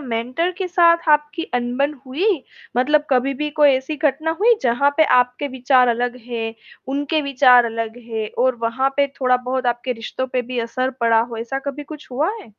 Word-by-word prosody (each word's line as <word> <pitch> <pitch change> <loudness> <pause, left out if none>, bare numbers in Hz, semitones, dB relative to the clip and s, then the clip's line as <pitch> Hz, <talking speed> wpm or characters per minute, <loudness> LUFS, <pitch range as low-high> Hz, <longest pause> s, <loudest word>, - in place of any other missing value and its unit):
Mentor 255 +6 -2
के 380 - -2
साथ 335 -1 +3
आपकी 300 +1 +2
अनबन 245 +4 0
हुई, 285 +10 -2 0.5
मतलब 295 +4 +2
कभी 260 +1 +2
भी 300 +3 -3
कोई 295 -1 +4
ऐसी 265 +3 -1
घटना 305 +1 0
हुई 470 +3 +5
जहाँ 250 +3 +2
पे 315 - +5
आपके 250 +3 +1
विचार 255 -1 +3
अलग 245 +1 -1
हैं, 225 -2 -4 0.3
उनके 290 +3 -1
विचार 255 -3 +5
अलग 230 0 -4
हैं 220 -2 -4 0.2
और 260 -1 +2
वहाँ 260 +4 +1
पे 280 0 +3
थोड़ा-बहुत 255 0 0
आपके 240 +1 -1
रिश्तों 235 +2 -5
पे 255 - 0
भी 250 +1 -5
असर 255 +3 -2
पड़ा 230 -1 +4
हो, 235 0 -4
ऐसा 235 +4 -4
कभी 280 +1 -5
कुछ 300 -1 -11
हुआ 290 +8 0
है? 225 - -15
260 Hz, 185 wpm, -20 LUFS, 240-290 Hz, 0.5 s, हुई